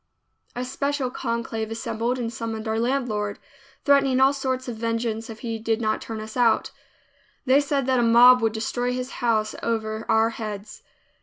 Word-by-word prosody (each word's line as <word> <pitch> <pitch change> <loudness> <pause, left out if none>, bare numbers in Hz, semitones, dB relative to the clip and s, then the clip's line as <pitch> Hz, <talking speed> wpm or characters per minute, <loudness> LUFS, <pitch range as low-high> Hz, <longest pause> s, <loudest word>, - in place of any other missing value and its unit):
A 245 +1 -3
special 280 0 -2
conclave 230 -3 -3
assembled 230 +2 -2
and 235 -2 -3
summoned 225 -1 -4
our 220 0 0
landlord, 230 -5 -1 0.5
threatening 275 -2 +4
all 265 +1 +5
sorts 260 -2 -2
of 240 - -4
vengeance 230 0 -2
if 220 -1 -9
he 230 -2 -3
did 225 0 0
not 215 -2 0
turn 225 -1 -6
us 215 0 -8
out. 240 -3 +2 0.7
They 270 +2 +5
said 285 -2 -1
that 260 -1 +2
a - - +3
mob 240 +2 +7
would 225 -1 +1
destroy 245 +2 -2
his 255 +1 -4
house 220 -3 +1
over 220 -1 -2
our 225 +1 +3
heads. 210 -2 -7
230 Hz, 170 wpm, -24 LUFS, 220-255 Hz, 0.7 s, mob